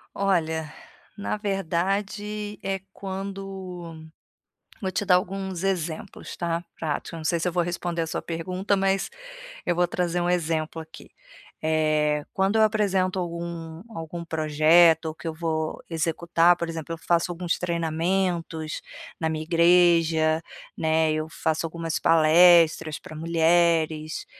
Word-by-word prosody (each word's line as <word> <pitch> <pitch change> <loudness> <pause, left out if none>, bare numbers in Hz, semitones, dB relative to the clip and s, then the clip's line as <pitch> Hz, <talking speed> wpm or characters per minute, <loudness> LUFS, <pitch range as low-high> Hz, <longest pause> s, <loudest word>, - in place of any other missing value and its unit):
Olha, 160 -5 0 0.4
na 205 +1 -2
verdade 205 +2 -2
é 195 0 -1
quando 190 -4 -7 0.8
vou 190 -1 -2
te 205 +2 -1
dar 180 -2 +5
alguns 190 0 -2
exemplos, 175 -4 -3
tá, 170 0 -2
práticos 155 0 -4
eu - - -5
não 160 - -7
sei 170 +1 +1
se 175 - -1
eu - - 0
vou 175 0 +1
responder 175 -1 -3
a 165 - -2
sua - - -3
pergunta, 185 +4 -2
mas 195 0 +1 0.6
eu 175 - +1
vou 175 0 +2
trazer 175 0 -1
um 175 - 0
exemplo 160 -2 -1
aqui. 160 0 -13 0.5
Eh, 155 -1 +1
quando 195 +3 +1
eu - - +5
apresento 195 -4 +1
algum 170 -1 -5
algum 165 +1 -6
projeto, 160 +1 +4
que 165 - -8
eu 160 - -2
vou 160 -1 -2
executar, 170 +1 +2
por 170 - -3
exemplo, 165 0 -5
eu - - -5
faço 170 0 +2
alguns 175 0 -2
treinamentos 170 -1 -1 0.4
na 160 -1 0
minha 155 0 -3
igreja, 165 -1 +4 0.4
né, 160 0 +2
eu 155 0 -2
faço 160 0 -1
algumas 165 0 -3
palestras 165 -1 +5
pra 155 - -11
mulheres, 165 -1 +1
170 Hz, 140 wpm, -25 LUFS, 160-180 Hz, 0.8 s, dar